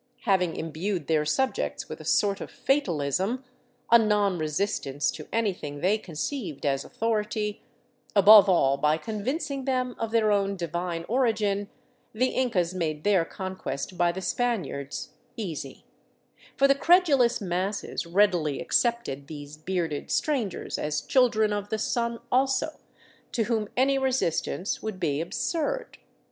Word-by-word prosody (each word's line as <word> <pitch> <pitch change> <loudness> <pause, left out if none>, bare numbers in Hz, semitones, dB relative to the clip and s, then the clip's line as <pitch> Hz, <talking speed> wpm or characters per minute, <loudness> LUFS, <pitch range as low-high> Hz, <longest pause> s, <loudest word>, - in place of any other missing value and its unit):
Having 185 -6 +1
imbued 165 +2 -3
their 155 -1 +1
subjects 260 +13 -1
with - - -8
a - - -11
sort 200 -1 +2
of - - -6
fatalism, 195 - 0 0.5
a 235 - +9
non 205 -4 +2
resistance 150 -3 -1
to 155 - -9
anything 190 -10 -2
they 200 +7 +2
conceived 170 - -5
as 140 -1 +1
authority, 215 -1 -2 0.5
above 205 0 +9
all 140 -7 +3
by 150 +2 +2
convincing 260 - -3
them 255 -2 -1
of 225 - -2
their 220 -2 +2
own 200 -1 +1
divine 170 -1 -3
origin, 215 -5 +1 0.4
the 255 +4 +1
Incas 190 -9 0
made 155 -4 -2
their 200 -4 +3
conquest 185 -2 -5
by 175 -1 +2
the 190 +2 -6
Spaniards 180 - -2 0.3
easy; 160 -10 -6 0.7
for 275 - +5
the 275 - +6
credulous 280 -6 +4
masses 190 -1 -2
readily 175 -6 +2
accepted 200 - 0
these 145 -1 -8
bearded 160 -2 -3
strangers 250 - -1
as 150 0 -1
Children 220 - +3
of 205 0 -3
the 220 - -1
Sun 235 +2 -1
also, 265 +4 +1 0.5
to 230 - +1
whom 220 -2 -1
any 270 +1 +3
resistance 250 -7 -1
would 215 -4 -5
be 150 -4 0
absurd. 355 - -2
200 Hz, 135 wpm, -27 LUFS, 165-235 Hz, 0.7 s, a